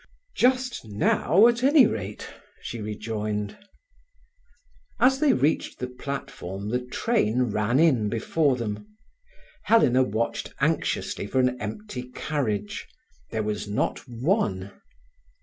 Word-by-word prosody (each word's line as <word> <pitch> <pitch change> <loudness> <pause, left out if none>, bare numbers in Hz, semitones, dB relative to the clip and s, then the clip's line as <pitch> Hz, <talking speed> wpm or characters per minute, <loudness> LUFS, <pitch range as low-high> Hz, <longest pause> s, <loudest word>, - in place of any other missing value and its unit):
"Just 255 0 +1
now, 125 - +3
at 235 0 +1
any 275 0 +6
rate," 105 - -4 0.3
she 115 - -6
rejoined. 105 -1 -3 1.4
As 265 +3 +4
they 300 -3 +4
reached 145 +5 +1
the 125 - -3
platform 125 -7 -6
the 125 +2 +1
train 125 - +1
ran 110 +6 +1
in 130 -11 +4
before 135 +6 +1
them. 120 - -6 0.7
Helena 130 - +5
watched 115 -1 -2
anxiously - - 0
for 130 - 0
an 125 -1 +2
empty 170 - -6
carriage. 110 -9 -2 0.4
There 110 - -2
was 105 0 -3
not 105 - -1
one. 115 - -1
125 Hz, 115 wpm, -26 LUFS, -, 1.4 s, any